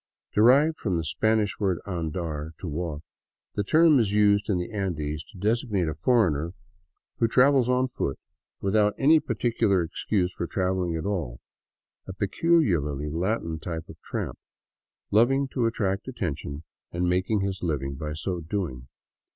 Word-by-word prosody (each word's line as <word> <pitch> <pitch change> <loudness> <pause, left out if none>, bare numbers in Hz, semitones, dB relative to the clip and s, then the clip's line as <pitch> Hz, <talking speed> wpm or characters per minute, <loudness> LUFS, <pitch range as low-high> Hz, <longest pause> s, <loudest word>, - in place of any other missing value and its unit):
Derived 140 +9 +5
from 95 -6 -1
the 80 - -1
Spanish 110 +5 +1
word 95 -4 +1
andar 80 -4 -4
(to 90 - -7
walk), 80 -1 -4 0.5
the 105 - -1
term 155 - +5
is 110 -4 +1
used 105 0 +3
in 100 - +2
the 90 +5 -4
Andes 75 -7 -3
to - - -16
designate 105 -2 0
a 80 - -1
foreigner 85 - +1 0.6
who 115 - +4
travels 130 +1 +4
on 125 +1 +2
foot, 70 - -3 0.4
without 105 +1 +2
any 155 +4 +5
particular 115 - +1
excuse 90 +2 -1
for 85 - -4
traveling 90 -2 -1
at 80 - -4
all; 85 -13 -3 0.7
a 95 - -5
peculiarly 90 - +1
Latin 85 -1 -1
type 80 -1 -5
of - - -12
tramp, - - -4 0.7
loving 135 +6 +4
to 125 -4 0
attract 100 -3 -1
attention 80 - -4 0.3
and 90 +1 -1
making 95 +4 +1
his 95 -1 -2
living 70 -5 -2
by 75 +2 -5
so 90 +3 -3
doing. 80 -8 -4
95 Hz, 150 wpm, -26 LUFS, 80-110 Hz, 0.7 s, Derived